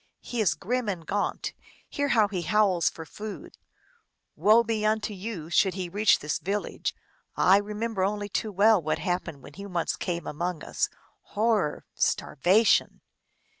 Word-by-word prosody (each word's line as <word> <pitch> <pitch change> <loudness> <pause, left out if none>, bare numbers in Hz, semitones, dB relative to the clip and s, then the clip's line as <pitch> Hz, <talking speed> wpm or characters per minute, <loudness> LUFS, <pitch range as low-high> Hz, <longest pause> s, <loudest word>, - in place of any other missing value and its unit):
He 240 -2 -3
is 180 -8 +2
grim 230 +7 -2
and 175 -5 -4
gaunt; 205 +5 -2 0.3
hear 285 0 -1
how 220 -6 +4
he 190 -3 -3
howls 185 0 +2
for 160 - -9
food! 210 +6 -9 0.8
Woe 220 +3 +5
be 220 -2 -2
unto 215 0 0
you, 185 -5 -6
should 190 +1 +3
he 185 -2 -4
reach 205 +4 +4
this 150 0 -3
village! 200 +3 -3 0.4
Ah, - - +3
I 195 - +8
remember 210 0 -2
only 205 +1 -1
too 215 +1 -2
well 205 +1 +4
what 155 0 -1
happened 175 -6 -3
when 140 - -12
he 200 +4 -8
once 175 -3 -1
came 170 -2 -3
among 170 +1 -3
us. - - -1 0.5
Horror! 215 -8 +1
starvation 195 +10 +2
200 Hz, 160 wpm, -27 LUFS, 175-215 Hz, 0.8 s, I